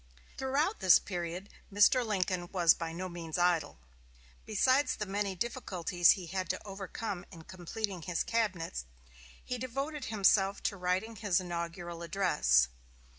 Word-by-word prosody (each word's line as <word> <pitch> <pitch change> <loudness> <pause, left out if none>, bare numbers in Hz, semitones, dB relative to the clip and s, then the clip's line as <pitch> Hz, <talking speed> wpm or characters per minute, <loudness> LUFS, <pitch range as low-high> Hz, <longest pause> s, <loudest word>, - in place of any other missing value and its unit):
Throughout 280 +10 0
this 185 -2 +7
period 175 0 -5 0.2
Mr. 205 +5 +5
Lincoln 185 -5 -1
was 175 -4 +5
by 165 -1 -5
no 180 +3 -4
means 170 -2 -5
idle. 175 -4 +1 0.7
Besides 260 +7 +3
the 210 - -3
many 200 0 -2
difficulties 180 -6 +2
he 185 - -7
had 185 +2 -3
to - - -3
overcome 195 0 -5
in 165 -4 -11
completing 185 +2 -5
his 175 +1 -1
cabinet, 190 - -1 0.6
he 250 -1 -3
devoted 275 +4 -4
himself 200 -2 +2
to 205 - 0
writing 190 +5 -1
his 195 -3 +1
inaugural 170 -1 -5
address. 65 - +3
185 Hz, 135 wpm, -32 LUFS, 175-215 Hz, 0.7 s, this